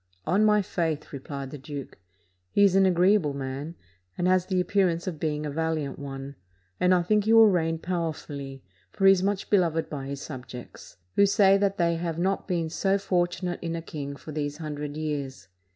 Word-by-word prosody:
"On 190 Hz, +6 st, +3 dB
my 210 Hz, -1 st, +4 dB
faith," 160 Hz, -5 st, -2 dB
replied 140 Hz, 0 st, -6 dB
the 150 Hz, -, -7 dB
duke, 140 Hz, -5 st, -8 dB, 0.5 s
"he 205 Hz, -, +3 dB
is 195 Hz, -2 st, +5 dB
an 195 Hz, 0 st, +5 dB
agreeable 180 Hz, -4 st, +3 dB
man, 140 Hz, +4 st, -5 dB, 0.4 s
and 175 Hz, -, +1 dB
has 185 Hz, -1 st, +3 dB
the 185 Hz, -2 st, +1 dB
appearance 180 Hz, -2 st, +1 dB
of 170 Hz, -5 st, -4 dB
being 150 Hz, -1 st, -2 dB
a 150 Hz, -, -3 dB
valiant 155 Hz, -2 st, -2 dB
one, 135 Hz, -1 st, -7 dB, 0.4 s
and 180 Hz, -, +3 dB
I 180 Hz, -1 st, +4 dB
think 210 Hz, +3 st, +2 dB
he 220 Hz, -, +3 dB
will 225 Hz, -2 st, +8 dB
reign 165 Hz, -2 st, +1 dB
power 170 Hz, -1 st, -2 dB
fully; 140 Hz, -3 st, -8 dB, 0.3 s
for 195 Hz, -, -1 dB
he 195 Hz, -, +9 dB
is 190 Hz, -2 st, +3 dB
much 200 Hz, 0 st, -1 dB
beloved 170 Hz, -5 st, +2 dB
by 140 Hz, -3 st, -5 dB
his 140 Hz, 0 st, -5 dB
subjects, 125 Hz, -, -9 dB, 0.2 s
who 200 Hz, -, +6 dB
say 195 Hz, -1 st, +5 dB
that 200 Hz, -1 st, +1 dB
they 170 Hz, -1 st, +2 dB
have 165 Hz, -1 st, -3 dB
not 190 Hz, +3 st, -1 dB
been 170 Hz, -4 st, 0 dB
so 195 Hz, +3 st, +1 dB
fortunate 180 Hz, -2 st, -1 dB
in 165 Hz, -1 st, -3 dB
a 165 Hz, -, -4 dB
king 140 Hz, -3 st, -6 dB
for 155 Hz, -, -10 dB
these 145 Hz, -1 st, -3 dB
hundred 150 Hz, -2 st, -5 dB
years. 140 Hz, -10 st, -4 dB
165 Hz, 200 wpm, -27 LUFS, 145-185 Hz, 0.5 s, he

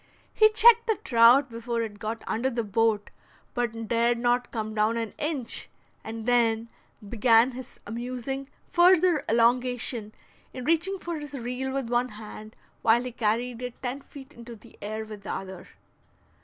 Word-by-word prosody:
He 435 Hz, 0 st, +6 dB
checked 465 Hz, +2 st, +6 dB
the 445 Hz, -, +2 dB
trout 240 Hz, +3 st, +5 dB
before 230 Hz, 0 st, -3 dB
it 205 Hz, -2 st, -7 dB
got 220 Hz, +2 st, -5 dB
under 245 Hz, +4 st, -1 dB
the 235 Hz, -2 st, -2 dB
boat, 215 Hz, 0 st, 0 dB, 0.4 s
but 230 Hz, -2 st, -3 dB
dared 235 Hz, +1 st, +2 dB
not 245 Hz, +1 st, 0 dB
come 215 Hz, -2 st, -4 dB
down 215 Hz, +2 st, +1 dB
an 225 Hz, -2 st, -4 dB
inch, 295 Hz, -5 st, -1 dB, 0.3 s
and 225 Hz, 0 st, -7 dB
then 230 Hz, -2 st, +2 dB, 0.4 s
began 230 Hz, +3 st, +4 dB
his 255 Hz, 0 st, -10 dB
amusing 250 Hz, +4 st, -5 dB, 0.2 s
further 355 Hz, -2 st, +4 dB
elongation 235 Hz, -1 st, +1 dB, 0.4 s
in 255 Hz, -1 st, -7 dB
reaching 335 Hz, +5 st, +1 dB
for 340 Hz, -3 st, -5 dB
his 295 Hz, -1 st, -8 dB
reel 250 Hz, +1 st, -4 dB
with 270 Hz, -2 st, -3 dB
one 245 Hz, +1 st, +1 dB
hand 215 Hz, 0 st, -10 dB, 0.3 s
while 230 Hz, +2 st, +4 dB
he 250 Hz, -, -5 dB
carried 235 Hz, +2 st, -1 dB
it 250 Hz, -1 st, -6 dB
ten 260 Hz, +2 st, -3 dB
feet 275 Hz, 0 st, -13 dB
into 235 Hz, -1 st, -11 dB
the 225 Hz, +2 st, -17 dB
air 215 Hz, +2 st, -4 dB
with 215 Hz, -2 st, -10 dB
the 200 Hz, -, -6 dB
other. 190 Hz, -1 st, -7 dB
240 Hz, 160 wpm, -26 LUFS, 225-265 Hz, 0.4 s, He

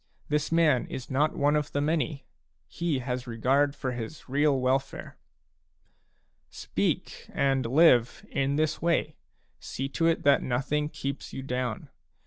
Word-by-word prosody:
This 150 Hz, +1 st, 0 dB
man 160 Hz, -6 st, +3 dB
is 130 Hz, 0 st, -7 dB
not 150 Hz, +4 st, +1 dB
one 145 Hz, +1 st, +3 dB
of 150 Hz, -1 st, -1 dB
the 145 Hz, -, 0 dB
many; 150 Hz, -1 st, -1 dB, 0.4 s
he 170 Hz, -4 st, -2 dB
has 125 Hz, 0 st, -4 dB
regard 135 Hz, +5 st, +1 dB
for 130 Hz, -2 st, -3 dB
his 125 Hz, +5 st, -7 dB
real 140 Hz, +1 st, +2 dB
welfare." 135 Hz, +2 st, -1 dB, 1.3 s
Speak, -, -, -3 dB
and 135 Hz, -3 st, +1 dB
live, 125 Hz, -3 st, +4 dB
in 140 Hz, +1 st, 0 dB
this 155 Hz, 0 st, 0 dB
way; 165 Hz, -3 st, +1 dB, 0.4 s
see 135 Hz, -, -4 dB
to 165 Hz, +4 st, +1 dB
it 165 Hz, -, +1 dB
that 140 Hz, 0 st, +5 dB
nothing 145 Hz, +4 st, -1 dB
keeps 140 Hz, -2 st, -5 dB
you 135 Hz, -, -5 dB
down. 125 Hz, -3 st, -3 dB
140 Hz, 140 wpm, -28 LUFS, 130-150 Hz, 1.3 s, that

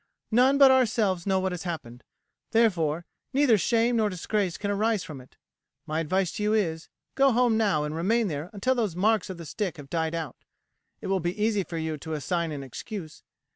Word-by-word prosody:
"None 255 Hz, +5 st, +4 dB
but 275 Hz, -1 st, +8 dB
ourselves 215 Hz, -8 st, +2 dB
know 190 Hz, -1 st, +2 dB
what 190 Hz, 0 st, -1 dB
has 180 Hz, -2 st, -5 dB
happened; 135 Hz, -9 st, -6 dB, 0.5 s
therefore, 175 Hz, -8 st, +2 dB, 0.3 s
neither 270 Hz, -4 st, +4 dB
shame 230 Hz, +4 st, +2 dB
nor 215 Hz, -2 st, +2 dB
disgrace 185 Hz, -1 st, -2 dB
can 205 Hz, +2 st, -2 dB
arise 210 Hz, 0 st, +1 dB
from 145 Hz, -4 st, -8 dB
it. 125 Hz, -, -20 dB, 0.5 s
My 155 Hz, +1 st, -2 dB
advice 185 Hz, +3 st, 0 dB
to -, -, -4 dB
you 210 Hz, +1 st, +1 dB
is, 165 Hz, -6 st, -1 dB, 0.2 s
go 275 Hz, 0 st, +4 dB
home 240 Hz, -1 st, +3 dB
now 200 Hz, -9 st, +2 dB
and 150 Hz, 0 st, -3 dB
remain 215 Hz, +7 st, +1 dB
there 150 Hz, 0 st, -4 dB
until 215 Hz, +5 st, 0 dB
those 220 Hz, -9 st, -1 dB
marks 215 Hz, +3 st, +2 dB
of 185 Hz, -, -6 dB
the 170 Hz, -, -8 dB
stick 185 Hz, +2 st, -3 dB
have 140 Hz, -2 st, -11 dB
died 160 Hz, -1 st, -1 dB
out; 160 Hz, -3 st, -5 dB, 0.6 s
it -, -, -8 dB
will 190 Hz, 0 st, +1 dB
be 175 Hz, +4 st, -3 dB
easy 210 Hz, -2 st, +1 dB
for 170 Hz, -, -6 dB
you 160 Hz, -2 st, -3 dB
to 160 Hz, +2 st, -6 dB
assign 165 Hz, +2 st, -1 dB
an 140 Hz, -2 st, -5 dB
excuse. 155 Hz, -, -8 dB
190 Hz, 205 wpm, -27 LUFS, 160-220 Hz, 0.6 s, but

